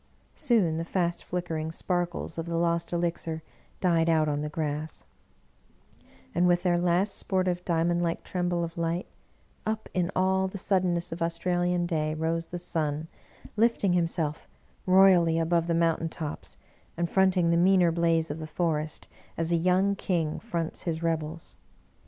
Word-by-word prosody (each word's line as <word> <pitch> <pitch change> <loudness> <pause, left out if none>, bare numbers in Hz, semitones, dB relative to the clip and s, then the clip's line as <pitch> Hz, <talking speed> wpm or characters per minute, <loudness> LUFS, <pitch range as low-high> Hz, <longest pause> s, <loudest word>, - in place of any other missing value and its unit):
Soon 220 - +2
the 165 - -2
fast 170 0 -1
flickering 165 -3 -3
sparkles 175 -1 -2
of 165 - -4
the 170 0 -1
lost 170 0 0
elixir 170 -2 -2 0.4
died 170 -3 +3
out 160 -1 +3
on 145 -1 -1
the 150 - -3
grass; 155 0 -4 1.3
and 175 +2 +3
with 175 0 +3
their 175 -2 +2
last 180 +3 +2
sportive 185 -2 0
diamond 170 0 +1
like 170 -1 -1
tremble 175 -1 -1
of 165 0 -5
light, 170 +2 -1 0.6
up, 220 0 -3
in 180 -2 0
all 190 +1 +2
the 190 - -6
suddenness 180 -3 0
of 165 - -6
Australian 175 +1 0
day, 155 -3 -1
rose 165 +1 -1
the 175 - -5
sun, 160 -2 -2 0.5
lifting 215 -4 +2
himself 165 -3 -1 0.4
royally 185 -3 +6
above 165 0 +1
th^ 170 - +1
mountain 165 -1 +1
tops, 155 -2 -5 0.4
and 170 0 0
front 190 +1 +3
ing 170 -2 +3
the - - +3
meaner 180 0 +4
blaze 165 -1 +1
of 150 - -5
the 155 - -6
forest 155 -2 -2 0.3
as 165 0 -1
a - - +4
young 185 +4 +2
king 170 -6 -1
fronts 170 -8 -4
his 165 -1 -3
rebels. 165 0 -3
170 Hz, 160 wpm, -28 LUFS, 165-180 Hz, 1.3 s, royally